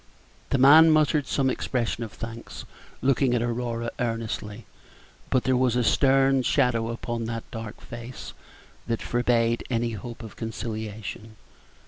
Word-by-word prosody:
The - - +2
man 150 +5 +8
muttered 155 -2 +3
some 135 -2 +1
expression 120 -2 -2
of 110 - -7
thanks, 115 0 -8 0.4
looking 130 -1 +3
at 120 - +1
Aurora 115 -1 -2
earnestly; 115 -2 -3 0.6
but 130 - +2
there 130 - +2
was 125 -1 +2
a 125 - +2
stern 135 +2 +4
shadow 125 -4 +1
upon 115 0 -4
that 115 0 -4
dark 115 -1 -7
face 120 +1 -9 0.5
that 115 -1 -2
forbade 120 -1 +1
any 120 -1 0
hope 115 +2 -7
of 110 - -10
conciliation. 110 -1 -6
120 Hz, 135 wpm, -26 LUFS, 115-130 Hz, 0.6 s, man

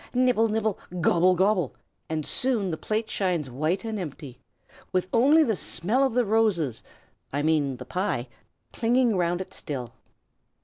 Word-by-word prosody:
"Nibble! 245 -3 +3
nibble! 220 -2 -1 0.2
Gobble! 175 +2 +4
gobble!" 185 - +1 0.3
and 155 -2 -2
soon 235 -8 0
the - - -1
plate 220 +5 -2
shines 175 -9 -1
white 155 - -1
and 220 -2 -3
empty, 145 -6 -7 0.5
with 185 0 0
only 285 +7 +6
the 225 -7 +1
smell 215 +10 0
of 265 -4 0
the 245 -1 +3
roses 200 - +1 0.5
I 145 +2 -1
mean 150 -4 +1
the 125 - -9
pie 175 -5 -2 0.5
clinging 235 0 +2
round 175 0 0
it 190 - -8
still. 130 -6 -5
185 Hz, 150 wpm, -26 LUFS, 155-225 Hz, 0.5 s, only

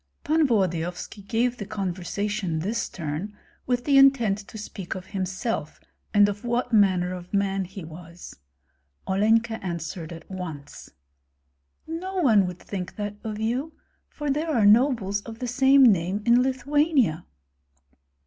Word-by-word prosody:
Pan 310 0 +3
Volodyovski 180 -3 -1
gave 235 +4 0
the 205 - -5
conversation 195 -1 -3
this 200 +9 -2
turn 170 +5 -5 0.3
with 245 -1 0
the 280 -2 +5
intent 240 -7 +4
to 210 +1 -11
speak 200 -3 -6
of 185 -1 -7
himself 190 - -3 0.3
and 205 -1 +5
of 205 +2 -4
what 240 0 -1
manner 185 -4 +3
of 180 -1 -9
man 195 -1 0
he 190 +1 -9
was. 170 +2 -11 0.7
Olenka 225 +3 +2
answered 170 -2 -5
at 165 -1 -10
once, 165 -7 -8 1.0
"No 355 +4 -5
one 225 - +4
would 180 -1 -6
think 185 -1 -6
that 205 0 -5
of 215 -1 -4
you, 250 +8 -2 0.4
for 295 -1 -3
there 305 +4 -1
are 235 -9 +2
nobles 210 -3 +3
of 225 +1 -9
the 250 - -4
same 270 +3 +5
name 195 -2 +3
in 240 +1 +5
Lithuania." 265 - +1
205 Hz, 140 wpm, -25 LUFS, 185-245 Hz, 1.0 s, the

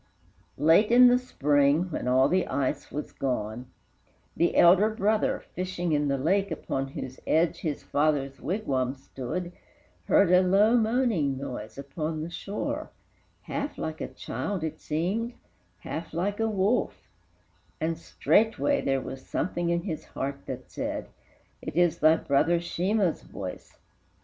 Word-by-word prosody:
Late 165 +9 +5
in 250 +1 +8
the 250 0 +4
Spring, 150 - +2
when 150 - -3
all 130 +1 +4
the 185 +4 +1
ice 140 +1 -2
was 150 - -5
gone, 125 -2 -3 0.7
The 170 - +1
elder 185 +5 +6
brother, 215 0 +1
fishing 180 -2 -2
in 145 -1 +2
the 140 0 +1
lake, 195 +8 +1
Upon 135 -4 -3
whose 130 -1 -7
edge 165 +1 +2
his 150 -4 -3
father's 140 -2 0
wigwam 135 - -1
stood, 135 +6 -5 0.5
Heard 195 -3 +4
a 180 0 +7
low 200 +5 +4
moaning 220 - +1
noise 130 -5 -6
upon 155 +3 -4
the 170 - -6
shore: 200 +4 -4 0.5
Half 285 - -4
like 160 0 -4
a - - -2
child 195 -5 -4
it 160 - -4
seemed, 200 +10 -2 0.5
half 165 0 -6
like 200 +5 -1
a 225 0 +1
wolf, 210 +4 0 0.7
And 165 +1 0
straightway 225 - +1
there 135 -1 0
was 130 0 -7
something 175 -1 -2
in 170 0 0
his 165 -6 -4
heart 140 +1 -5
That - - -7
said, - - -4 0.5
"It - - -6
is 170 -1 +3
thy 155 +1 +6
brother 165 +3 +2
Sheemah's 180 +2 0
voice." 95 -2 -8
165 Hz, 145 wpm, -27 LUFS, 140-195 Hz, 0.7 s, in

